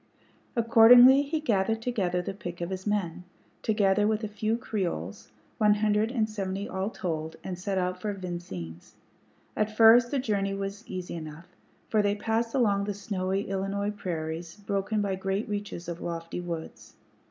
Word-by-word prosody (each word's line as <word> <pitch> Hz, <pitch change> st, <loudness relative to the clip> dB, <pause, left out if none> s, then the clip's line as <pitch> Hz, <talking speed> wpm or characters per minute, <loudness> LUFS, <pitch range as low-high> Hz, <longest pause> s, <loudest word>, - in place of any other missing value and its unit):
Accordingly 240 Hz, +3 st, +8 dB
he 295 Hz, +3 st, -2 dB
gathered 225 Hz, -6 st, +1 dB
together 195 Hz, -7 st, -1 dB
the 195 Hz, -, -4 dB
pick 175 Hz, -3 st, -7 dB
of 170 Hz, +2 st, -4 dB
his 190 Hz, +1 st, -5 dB
men, 185 Hz, -4 st, -1 dB, 0.4 s
together 205 Hz, -1 st, +2 dB
with 220 Hz, 0 st, 0 dB
a -, -, -1 dB
few 215 Hz, +2 st, -1 dB
Creoles, 175 Hz, -, -4 dB, 0.3 s
one 210 Hz, -1 st, +5 dB
hundred 210 Hz, +1 st, +1 dB
and 225 Hz, -4 st, +1 dB
seventy 200 Hz, -2 st, -4 dB
all 190 Hz, +2 st, -2 dB
told, 160 Hz, -6 st, -4 dB
and 185 Hz, -, -4 dB
set 190 Hz, +2 st, -3 dB
out 180 Hz, 0 st, -1 dB
for 210 Hz, -, -1 dB
Vincennes. 175 Hz, -, -7 dB, 0.6 s
At 215 Hz, 0 st, -1 dB
first 235 Hz, +2 st, +7 dB
the 280 Hz, -, -1 dB
journey 200 Hz, -5 st, 0 dB
was 200 Hz, +2 st, -5 dB
easy 185 Hz, -1 st, -5 dB
enough, 160 Hz, +1 st, -8 dB, 0.4 s
for 215 Hz, -, +2 dB
they 205 Hz, 0 st, +1 dB
passed 225 Hz, +3 st, -1 dB
across 200 Hz, -6 st, +2 dB
the 205 Hz, -, -2 dB
snowy 195 Hz, -1 st, -2 dB
Illinois 195 Hz, +1 st, -2 dB
prairies, 165 Hz, -4 st, -5 dB
broken 205 Hz, 0 st, -1 dB
by 200 Hz, -1 st, -1 dB
great 195 Hz, +2 st, -2 dB
reaches 205 Hz, -4 st, -5 dB
of 170 Hz, -1 st, -5 dB
lofty 165 Hz, 0 st, -4 dB
woods. 160 Hz, -10 st, -7 dB
200 Hz, 165 wpm, -28 LUFS, 180-215 Hz, 0.6 s, Accordingly